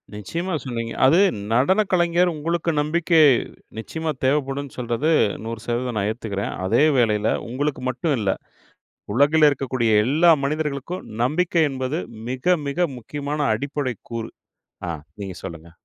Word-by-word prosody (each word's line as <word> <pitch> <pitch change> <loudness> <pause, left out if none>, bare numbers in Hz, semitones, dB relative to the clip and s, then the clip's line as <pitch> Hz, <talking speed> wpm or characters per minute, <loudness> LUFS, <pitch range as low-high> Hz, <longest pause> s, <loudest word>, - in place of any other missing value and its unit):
நிச்சயமா 170 - -4
சொன்னீங்க. 115 -3 -4
அது 155 +6 +6 0.4
நடன 185 - +4
கலைஞர் 175 0 +3
உங்களுக்கு 165 +2 -1
நம்பிக்கை, 165 +2 +2 0.6
நிச்சயமா 160 +7 -3
தேவைப்படுன்னு 135 0 0
சொல்றது, 125 +5 -1 0.4
100% 120 +1 -3
நான் 100 -1 0
ஏத்துக்கிறேன். 105 -3 -4
அதே 115 +9 +3
வேளையில, 110 -3 +2 0.2
உங்களுக்கு 140 +2 -2
மட்டும் 140 +4 0
இல்ல, 100 -3 +1 0.8
உலகில 150 +4 +5
இருக்கக்கூடிய 130 -4 -1 0.2
எல்லா 160 +6 +5
மனிதர்களுக்கும், 150 +3 -3 0.2
நம்பிக்கை 165 +3 +2
என்பது 135 +5 -2 0.3
மிக, 155 +8 +2
மிக 175 +5 +1
முக்கியமான 145 +5 -4
அடிப்படை 140 +1 -3 0.2
கூறு. 115 -1 -4 0.6
ஆ - - -1 0.3
நீங்க 95 -2 -5
சொல்லுங்க. 85 0 -8
140 Hz, 120 wpm, -22 LUFS, 115-160 Hz, 0.8 s, அது